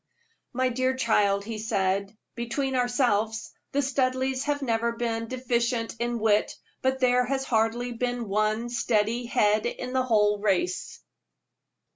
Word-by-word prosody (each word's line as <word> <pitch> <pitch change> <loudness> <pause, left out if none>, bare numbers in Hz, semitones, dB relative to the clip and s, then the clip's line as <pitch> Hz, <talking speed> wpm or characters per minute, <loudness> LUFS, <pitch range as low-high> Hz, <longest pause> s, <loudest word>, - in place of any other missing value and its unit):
"My 255 +1 +1
dear 255 +1 0
child," 205 -5 +2
he 220 -1 -5
said, 200 -1 -1 0.2
"between 260 +3 -2
ourselves, 240 -3 0 0.2
the 285 +1 +1
Studleighs 260 0 0
have 290 -1 -1
never 235 -1 0
been 230 -1 -2
deficient 235 -2 -1
in 240 0 -1
wit, 215 -2 +2 0.3
but 265 0 +1
there 250 0 +4
has 270 +1 -1
hardly 235 0 0
been 245 -1 -2
one 215 +3 0
steady 235 0 0
head 215 -3 +2
in 250 +1 -5
the 260 - +2
whole 210 -4 +2
race." 190 -3 -1
235 Hz, 135 wpm, -26 LUFS, 215-255 Hz, 0.3 s, there